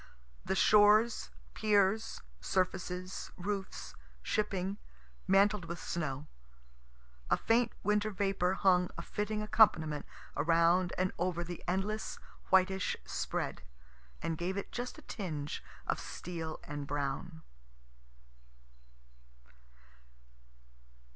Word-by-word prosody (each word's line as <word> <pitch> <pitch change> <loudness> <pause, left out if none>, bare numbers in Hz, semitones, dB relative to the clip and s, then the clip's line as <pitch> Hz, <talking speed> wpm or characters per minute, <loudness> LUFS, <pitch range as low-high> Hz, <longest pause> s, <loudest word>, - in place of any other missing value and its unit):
The 190 - -1
shores, 210 +3 +5 0.2
piers, 210 +1 +2 0.2
surfaces, 185 - -2
roofs, 195 +1 -4 0.3
shipping, 195 -1 -1 0.5
mantled 200 -1 +4
with 170 +1 -5
snow. 150 -5 -3 1.0
A - - +4
faint 230 0 +2
winter 210 +1 +2
vapor 195 -2 +1
hung 180 -2 +4
a - - -4
fitting 215 0 -2
accompaniment 160 -9 +4 0.3
around 170 +3 +3
and 185 0 +1
over 175 -1 0
the 175 0 -7
endless 195 +4 -1 0.3
whitish 190 0 +3
spread, - - -2 0.6
and 165 -1 -2
gave 185 +3 -1
it 200 - -4
just 245 +4 -4
a 310 - -12
tinge 155 -9 -4 0.2
of - - 0
steel 165 -3 -5
and 145 -1 -5
brown. 135 - -3
185 Hz, 95 wpm, -33 LUFS, 170-205 Hz, 1.0 s, shores